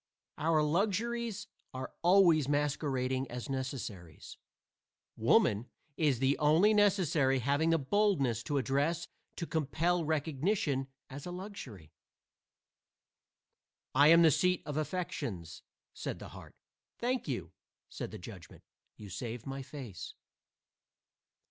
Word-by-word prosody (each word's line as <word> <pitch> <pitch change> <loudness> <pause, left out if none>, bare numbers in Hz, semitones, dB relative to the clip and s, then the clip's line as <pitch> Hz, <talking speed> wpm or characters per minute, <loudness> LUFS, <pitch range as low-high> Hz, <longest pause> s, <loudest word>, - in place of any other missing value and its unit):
Our 155 0 +3
luxuries 215 +7 0 0.3
are 130 0 -5
always 170 -5 +5
masquerading 135 -3 0
as 125 +1 -6
necessaries. 115 - -6 0.8
Woman 105 +5 +3 0.3
is 145 -6 +2
the 135 +3 +1
only 160 +8 +5
necessary 175 -10 +3
having 140 +6 +1
the 165 - +4
boldness 140 - +1
and 145 - +1
address 145 +6 0 0.3
to 170 - -4
compel 165 +3 0
recognition 150 -1 0 0.2
as 140 +5 -8
a - - -5
luxury. 160 - -9 2.0
"I 145 - +6
am 165 +2 +8
the 160 - +7
seat 180 +5 +2
of 150 - -4
the 155 - 0
affections," 125 - -4 0.3
said - - -5
the - - -9
heart. - - -12 0.4
"Thank 250 -2 -1
you," 95 - -3 0.4
said - - -6
the - - -8
judgment, - - -11 0.3
"you 105 - -10
save 115 +4 -6
my 135 0 -5
face." 130 - -8
150 Hz, 115 wpm, -32 LUFS, 130-175 Hz, 2.0 s, am